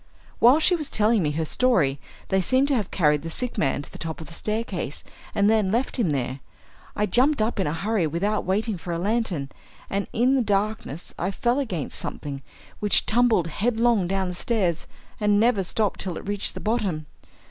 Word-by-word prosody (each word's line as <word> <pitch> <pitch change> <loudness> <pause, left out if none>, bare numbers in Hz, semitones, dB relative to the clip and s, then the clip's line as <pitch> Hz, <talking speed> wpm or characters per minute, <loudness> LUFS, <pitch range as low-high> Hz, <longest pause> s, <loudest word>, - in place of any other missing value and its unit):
While 250 +6 +6
she 355 +3 +4
was 305 -4 -4
telling 215 0 +3
me 150 - +1
her 160 +1 -1
story 155 - +2 0.3
they 190 -1 +2
seem 260 +9 +3
to 280 -1 +1
have 210 -6 -1
carried 150 -4 +2
the 165 - -6
sick 250 +8 -2
man 140 0 0
to - - -9
the - - -10
top 160 -1 -4
of 160 - -7
the 170 - -12
staircase 210 -7 -3 0.3
and 200 0 +3
then 215 -3 +3
left 245 +5 0
him 220 -9 +1
there. 135 -2 -2 0.6
I 210 - +1
jumped 255 +8 +3
up 215 0 0
in 190 - +1
a 150 - -1
hurry 195 0 0
without 200 +7 -1
waiting 200 +1 -1
for 175 - -6
a 170 - -1
lantern, 190 -7 -1 0.4
and 200 0 -1
in 250 +4 +2
the 270 - +3
darkness 205 - -2
I 175 - 0
fell 240 +6 0
against 185 - -3
something, 140 -2 -5 0.4
which 205 -1 +3
tumbled 230 -6 +3
headlong 225 +2 +1
down 190 0 0
the - - -4
stairs 180 -4 -1 0.3
and 210 -1 +3
never 220 -3 +3
stopped 205 +3 -1
till 180 -4 -3
it - - -9
reached 205 0 -2
the - - -5
bottom. 205 -9 -1
205 Hz, 200 wpm, -24 LUFS, 170-230 Hz, 0.6 s, While